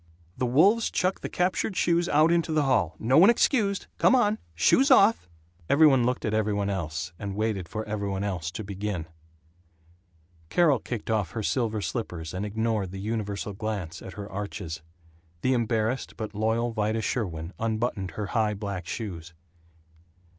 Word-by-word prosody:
The 125 - -1
wolves 195 - +4
chuck 185 +1 0
the - - -4
captured 185 +2 -1
shoes 170 0 +2
out 155 +3 +4
into 170 -1 +1
the 155 -1 +2
hall. 105 - +1
No 130 +6 +3
one 190 +6 +8
excused! 215 -4 +2
Come - - +5
on! 215 -3 +2 0.2
Shoes 265 - +4
off!" 220 - +5 0.4
Every 155 +3 +6
one 130 -5 +5
looked 125 - -1
at 110 - -1
every 110 -1 +1
one 100 0 -1
else 85 -2 -4
and 100 -2 -5
waited 105 -4 -2
for 110 0 -4
every 105 -1 -3
one 95 0 -2
else 90 -6 -2
to 110 - -5
begin. 100 -3 -4 1.4
Carol 150 - +3
kicked 115 -1 -5
off 105 -7 0
her 110 - -3
silver 110 -2 0
slippers, 80 +1 -4
and 95 +3 -3
ignored 110 -2 -1
the 95 +1 -7
universal 105 -1 -3
glance 100 -5 -4
at 95 - -9
her 100 +1 -7
arches. 95 -5 -5 0.6
The 130 - +2
embarrassed 115 +1 -1
but 110 -2 -5
loyal 110 +3 0
Vida 110 0 -1
Sherwin 85 -8 -3
unbuttoned 110 -5 -2
her 105 - -2
high 110 -2 +1
black 100 -3 -5
shoes. 85 -6 -6
110 Hz, 170 wpm, -27 LUFS, 100-130 Hz, 1.4 s, one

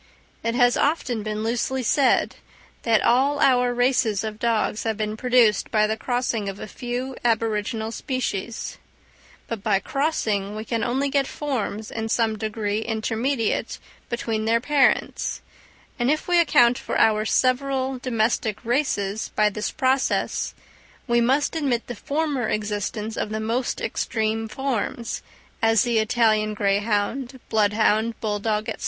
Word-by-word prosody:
It 230 0 -1
has 245 0 +4
often 275 -7 0
been 215 0 -3
loosely 245 +3 -1
said 265 +3 +2 0.4
that 225 -2 +2
all 275 +4 +3
our 250 -3 +4
races 245 -4 +1
of 215 -1 -5
dogs 225 -2 0
have 220 -2 -2
been 215 0 -2
produced 240 -2 +3
by 215 -1 +3
the 215 +1 0
crossing 235 -3 -1
of 195 +1 -7
a - - -5
few 250 +3 -5
aboriginal 225 -1 0
species; 230 -4 -4 0.7
but 230 -3 -4
by 200 -1 +2
crossing 210 -5 -1
we 215 +1 -5
can 230 -1 -1
only 265 +3 0
get 275 -1 +1
forms 225 -7 -3
in 225 0 -3
some 225 -1 +1
degree 215 -1 -2
intermediate 225 +2 -1 0.3
between 225 -2 -2
their 230 +1 +3
parents; 285 +2 +1 0.6
and 240 +1 +2
if 305 +1 0
we 350 -1 +4
account 250 -6 +4
for - - -3
our 215 -1 +4
several 260 +2 +1
domestic 225 -2 -1
races 220 -5 0
by 210 0 +4
this 210 +1 -3
process, 265 -1 0 0.5
we 235 -1 +2
must 270 +7 +2
admit 270 -7 0
the 245 - -5
former 280 -1 -1
existence 210 +1 -2
of - - -2
the 215 0 -3
most 230 +3 -1
extreme 220 -1 -1
forms, 235 -1 -3 0.4
as 225 -2 +4
the 235 -2 +2
Italian 215 -1 +2
greyhound, 210 +6 0
bloodhound, 220 +1 +2
bull 210 -2 -1
dog, 215 0 -1
&c. - - -1
230 Hz, 145 wpm, -24 LUFS, 215-255 Hz, 0.7 s, has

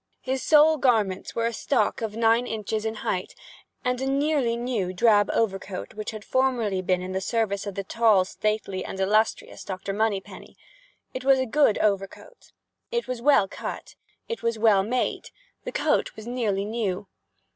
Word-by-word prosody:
His 260 0 -2
sole 310 +1 +5
garments 220 -8 +1
were 230 - 0
a 230 - -1
stock 255 +3 0
of 220 -2 -3
nine 230 +2 +3
inches 220 0 -3
in 220 0 -2
height, 185 -1 -2 0.5
and 250 0 0
a 265 - -1
nearly 275 -4 +1
new 235 -7 -2
drab 205 0 +4
overcoat 195 -3 -2
which 215 0 -5
had 215 -2 -8
formerly 240 -7 +1
been 180 0 0
in 185 - -5
the 190 0 -2
service 205 -1 -1
of 200 - -5
the 195 - -3
tall, 210 -2 +3
stately, 210 -2 -2
and 190 - -7
illustrious 215 +3 0
Dr. 195 +1 -5
Moneypenny. 205 -2 -3 0.6
It 255 - -5
was 270 0 +5
a 260 - 0
good 255 -2 +3
overcoat. 200 - -3 0.4
It 475 0 -2
was 250 -2 -4
well 275 -7 +4
cut. - - -7 0.3
It 465 - -4
was 230 -1 -1
well 215 -3 +4
made. 245 +6 -2 0.4
The - - -4
coat - - 0
was 215 - -10
nearly 220 -5 -1
new. 205 -4 -2
220 Hz, 170 wpm, -25 LUFS, 195-250 Hz, 0.6 s, sole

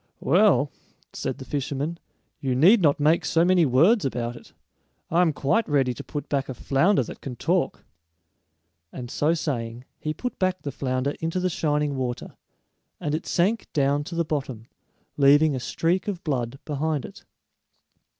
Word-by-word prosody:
"Well," - - +3 0.4
said - - -3
the - - -9
fisherman, 145 +3 -3 0.4
"you 130 -2 -1
need 185 - +6
not 145 -4 +3
make 155 +3 +3
so 165 +1 +2
many 180 -3 +4
words 170 - +4
about 120 -2 -2
it. - - -14 0.6
I 170 +2 +4
am 170 -3 +3
quite 145 +9 0
ready 135 -4 +2
to - - -8
put 145 - -6
back 135 -2 -1
a 130 - -4
flounder 140 - +2
that - - -10
can 130 -3 -6
talk." - - -1 1.1
And 120 -2 -7
so 155 +3 +1
saying, 120 -6 -4
he 155 - -3
put 250 +9 -5
back 185 -1 0
the 140 - -3
flounder 130 0 -1
into 165 +3 -2
the 180 0 0
shining 150 -4 0
water, 125 -2 -4 0.6
and 145 - -2
it 155 - -3
sank 200 +6 0
down 145 0 +2
to 170 - -7
the 170 0 0
bottom, 135 -7 -4 0.5
leaving 145 +1 +5
a - - -2
streak 170 +9 -1
of 190 -4 -4
blood 130 -4 -2
behind 150 -1 -2
it. - - -12
145 Hz, 170 wpm, -25 LUFS, 135-170 Hz, 1.1 s, need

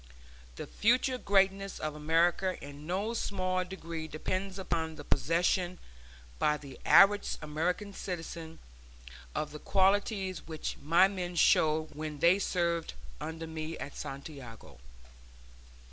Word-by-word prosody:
The - - -6
future 250 +3 +2
greatness 195 -1 +2
of 155 -1 -3
America 165 +5 +2
in 145 +2 -10
no 200 +6 -1
small 185 -4 -1
degree 165 -3 -6
depends 185 +5 -3
upon 165 -4 -2
the 145 - -9
possession 175 +4 +1 0.6
by 150 0 +3
the 140 -3 -11
average 205 +1 +6
American 180 +7 -2
citizen 165 -3 -6 0.8
of 150 -1 -2
the 150 - -8
qualities 195 0 +1
which 160 -2 -4
my 170 +5 +5
men 180 -3 -4
showed 155 -1 +3
when 155 0 -5
they 170 +6 +5
served 170 -4 -1 0.2
under 160 0 -5
me 160 0 -5
at 140 - -7
Santiago. 135 - -8
170 Hz, 120 wpm, -31 LUFS, 155-190 Hz, 0.8 s, average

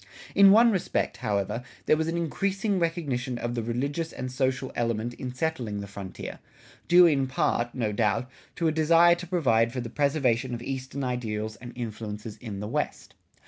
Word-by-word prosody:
In 200 0 +8
one 230 +4 +7
respect, 185 - -1
however, 105 -1 -1 0.2
there - - +5
was 160 +1 -1
an 165 +1 -1
increasing 195 +4 0
recognition 140 -8 -1
of 120 0 -3
the 120 - -1
religious 140 +8 -2
and 130 0 -5
social 130 0 -1
element 115 0 -1
in 125 +1 -6
settling 125 -7 -2
the 100 - -5
frontier, 100 -2 -8 0.5
due 175 +1 +8
in 140 -5 +3
part, 120 -2 0
no 115 -5 0
doubt, 110 +3 +1 0.3
to 165 - 0
a - - +3
desire 165 +2 +5
to 175 +1 -5
provide 120 -10 +2
for 125 - -4
the 120 -1 -4
preservation 130 -4 +1
of 120 - -7
eastern 135 +1 -4
ideals 110 -4 -3
and 120 -1 -9
influences 110 -2 -6
in 105 -5 -6
the 105 - -4
West. - - -3
125 Hz, 180 wpm, -27 LUFS, 115-160 Hz, 0.5 s, In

